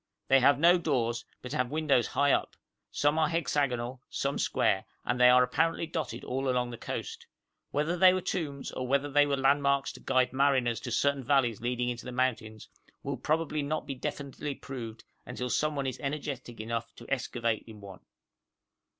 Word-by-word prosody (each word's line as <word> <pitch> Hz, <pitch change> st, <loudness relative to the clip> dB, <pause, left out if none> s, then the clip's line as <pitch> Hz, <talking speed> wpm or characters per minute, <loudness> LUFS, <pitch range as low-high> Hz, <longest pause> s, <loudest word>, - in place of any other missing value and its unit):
They 135 Hz, -, +7 dB
have 140 Hz, +2 st, +5 dB
no 175 Hz, +4 st, +5 dB
doors, 120 Hz, -7 st, -1 dB, 0.2 s
but 125 Hz, -, -7 dB
have 125 Hz, -5 st, 0 dB
windows 150 Hz, -5 st, +2 dB
high 145 Hz, 0 st, +2 dB
up: -, -, 0 dB, 0.3 s
some 145 Hz, +2 st, +1 dB
are 155 Hz, -1 st, +3 dB
hexagonal, 130 Hz, -6 st, -1 dB
some 140 Hz, +1 st, -2 dB
square, 100 Hz, -4 st, +1 dB, 0.2 s
and 125 Hz, +1 st, 0 dB
they 125 Hz, -, +8 dB
are 125 Hz, 0 st, +7 dB
apparently 165 Hz, +7 st, 0 dB
dotted 160 Hz, -2 st, -4 dB
all 135 Hz, +1 st, -2 dB
along 125 Hz, -1 st, 0 dB
the 120 Hz, -, -7 dB
coast. -, -, -6 dB, 0.4 s
Whether 150 Hz, +4 st, 0 dB
they 185 Hz, +1 st, +7 dB
were 185 Hz, -, +1 dB
tombs, 145 Hz, -6 st, -3 dB
or 130 Hz, -, -4 dB
whether 140 Hz, +2 st, +1 dB
they 145 Hz, +1 st, +5 dB
were 140 Hz, -1 st, 0 dB
landmarks 140 Hz, 0 st, +2 dB
to -, -, -12 dB
guide 130 Hz, -1 st, +1 dB
mariners 130 Hz, -4 st, +2 dB
to -, -, -6 dB
certain 140 Hz, -1 st, +1 dB
valleys 120 Hz, -5 st, +2 dB
leading 125 Hz, 0 st, -1 dB
into 120 Hz, 0 st, -5 dB
the 125 Hz, -, -5 dB
mountains, 115 Hz, -4 st, -2 dB, 0.4 s
will -, -, -2 dB
probably 155 Hz, -1 st, -1 dB
not 155 Hz, +2 st, -2 dB
be 140 Hz, -, -4 dB
definitely 140 Hz, +1 st, -5 dB
proved 115 Hz, -5 st, -8 dB, 0.2 s
until 125 Hz, 0 st, -5 dB
someone 150 Hz, -2 st, 0 dB
is 130 Hz, -3 st, -3 dB
energetic 140 Hz, -4 st, -5 dB
enough 115 Hz, +1 st, -4 dB
to 120 Hz, -, -12 dB
excavate 115 Hz, -4 st, -1 dB
in 110 Hz, -2 st, -11 dB
one. 100 Hz, -2 st, -11 dB
135 Hz, 180 wpm, -29 LUFS, 120-145 Hz, 0.4 s, they